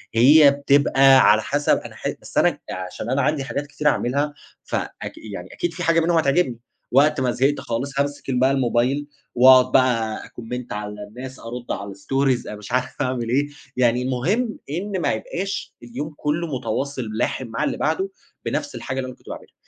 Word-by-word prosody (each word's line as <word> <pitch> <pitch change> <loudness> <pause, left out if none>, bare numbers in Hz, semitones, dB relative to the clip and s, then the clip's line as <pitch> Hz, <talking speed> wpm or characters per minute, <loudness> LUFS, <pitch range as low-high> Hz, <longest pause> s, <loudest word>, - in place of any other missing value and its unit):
هي 140 +5 +7
بتبقى 140 -1 +5
على 110 +1 +3
حسَب 145 +5 +1
أنا - - -9
ح - - -4
بس - - -9
أنا - - +3
عشان 95 +4 -6
أنا 135 +2 +1
عندي 145 +1 0
حاجات 140 +2 -4
كتيرة 150 +1 +1
أعمَلها، 140 +3 0 0.3
فأك - - -4
يعني 100 -4 -8
أكيد 175 -1 -2
في 180 - -5
حاجة 165 0 +3
منهم 165 +1 +2
هتعجبني. 140 -5 +2 0.3
وقت 140 +2 +4
ما 125 -1 +1
زهقت 135 +4 +1
خالِص، 135 +4 -3
هامسِك 145 -1 -2
بقى 130 +2 +3
الموبايل 135 +2 +1 0.3
وأقعد 130 0 +7
بقى 115 -4 +2
أcomment 125 +1 -7
على 105 0 -5
الناس، 130 +5 -9
أرُدّ 120 +1 -7
على 100 0 -4
stories، 135 +5 0
مش 105 0 -9
عارِف 125 0 -1
أعمَل 125 -3 -1
إيه. 140 +4 +2 0.3
يعني 125 -1 +3
المهم 170 - 0
إن 190 +5 -3
ما 150 - +1
يبقاش 185 - -4
اليوم 135 +6 -6
كله 155 +3 -1
متواصل 130 +3 -3
لاحِم 120 +3 -1
مع 115 0 -3
اللي - - -1
بعده، 160 +6 0 0.4
بنفس 290 -1 -2
الحاجة 130 0 -4
اللي 130 - -3
أنا 130 - -8
كنت - - -17
باعملها. - - -9
130 Hz, 175 wpm, -22 LUFS, 120-145 Hz, 0.4 s, هي